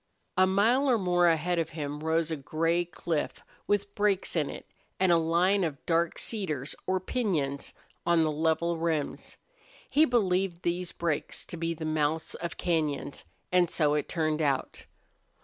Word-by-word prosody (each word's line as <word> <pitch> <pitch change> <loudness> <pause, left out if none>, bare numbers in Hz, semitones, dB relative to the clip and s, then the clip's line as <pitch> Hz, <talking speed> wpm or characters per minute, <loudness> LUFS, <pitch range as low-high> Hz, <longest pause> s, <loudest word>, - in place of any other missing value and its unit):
A 185 0 +5
mile 230 +9 +3
or 245 - +4
more 175 -3 +3
ahead 170 +1 +2
of 165 -1 -1
him 145 -1 -3
rose 160 +1 0
a - - 0
gray 165 +4 0
cliff 165 -2 -3 0.2
with 205 0 0
breaks 205 -3 +1
in 155 -4 +1
it - - -8 0.3
and 185 -1 +4
a 170 - +6
line 175 +4 +2
of 150 -5 -4
dark 165 0 +1
cedars 155 - -3
or 185 0 +1
piñons 170 - -2 0.3
on 170 -1 +3
the 155 - +1
level 160 +2 0
rims. 160 -3 -2 0.5
He 305 +2 +5
believed 190 - +1
these 175 +1 -1
breaks 170 -3 -2
to - - -8
be 165 0 -2
the 160 0 -6
mouths 155 0 0
of 170 -1 -5
cañons, 155 -5 -1 0.3
and 180 -2 +4
so 150 -4 +2
it 150 -1 -1
turned 155 -2 0
out. 140 -3 -1
170 Hz, 165 wpm, -29 LUFS, 155-185 Hz, 0.5 s, a